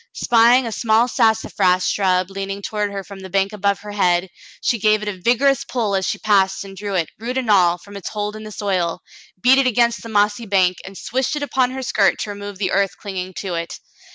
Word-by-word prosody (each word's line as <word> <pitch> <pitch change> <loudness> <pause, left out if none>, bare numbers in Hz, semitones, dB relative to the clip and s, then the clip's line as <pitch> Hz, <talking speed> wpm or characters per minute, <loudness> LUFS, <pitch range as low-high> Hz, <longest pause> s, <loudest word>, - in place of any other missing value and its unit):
Spying 240 +2 +4
a 230 - -4
small 225 +1 +2
sassafras 205 -6 +2
shrub 185 -1 +1
leaning 195 +1 -5
toward 210 -1 -2
her 195 -1 -5
from 200 0 -11
the 190 0 -9
bank 195 +2 0
above 200 -1 0
her 210 0 -8
head, 180 -2 +1 0.3
she 235 - 0
gave 215 +1 +2
it - - -6
a 210 - -1
vigorous 245 +8 +2
pull 225 -5 -2
as 190 -1 0
she - - -1
passed 195 -2 +2
and 195 -1 -11
drew 200 0 -4
it, 170 -4 -1
root 245 +3 -4
and 245 -4 0
all, 175 -3 +4
from 200 +3 -14
its 200 - -6
hold 210 0 -4
in 215 - -8
the 215 - -9
soil, 185 -5 -2 0.4
beat 255 +7 +5
it 270 - +3
against 235 -1 +2
the 230 - -9
mossy 210 +1 +1
bank, 185 -3 +2
and 190 0 -10
swished 260 +4 -2
it 295 - -3
upon 260 -3 +1
her 260 +1 -5
skirt - - +2
to 210 - -3
remove 205 -1 -8
the 185 -2 -1
earth 195 -1 0
cling 200 -2 -7
ing 185 +1 -4
to 190 -3 -4
it. 170 0 -4
205 Hz, 235 wpm, -20 LUFS, 190-225 Hz, 0.4 s, beat